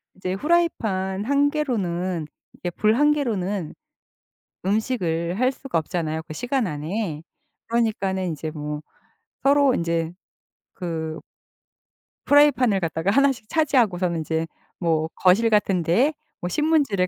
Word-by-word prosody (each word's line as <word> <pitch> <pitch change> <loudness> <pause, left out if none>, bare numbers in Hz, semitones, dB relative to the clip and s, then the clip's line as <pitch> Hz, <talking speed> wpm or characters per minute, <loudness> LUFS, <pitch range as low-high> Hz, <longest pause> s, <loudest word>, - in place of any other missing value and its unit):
이제 185 0 -3
프라이팬 205 - 0
1 285 +2 +3
개로는 185 - -1 0.3
이렇게 175 - -5
불 215 +1 +4
1 295 +3 +4
개로는 205 - -1 0.9
음식을 190 -4 0
할 255 +1 +3
수가 270 -5 -3
없잖아요 160 0 -2
그 - - -7
시간 245 - -1
안에. 155 +2 -3 0.5
그러니까는 210 -5 0
인제 155 0 -4
뭐 150 0 -5 0.6
서로 280 -1 +4
인제 170 -2 -1 0.6
그 160 -3 -4 1.1
프라이팬을 260 -8 +5
갖다가 165 +2 -1
1 275 +4 +4
씩 230 -4 -9
차지하고서는 210 - +2
인제 160 +1 -2 0.3
뭐 160 -3 +1
거실 195 +5 +4
같은 200 -4 +2
데에 235 - +3 0.3
뭐 175 - -2
신문지를 290 - +2
190 Hz, 255 characters per minute, -23 LUFS, 170-255 Hz, 1.1 s, 프라이팬을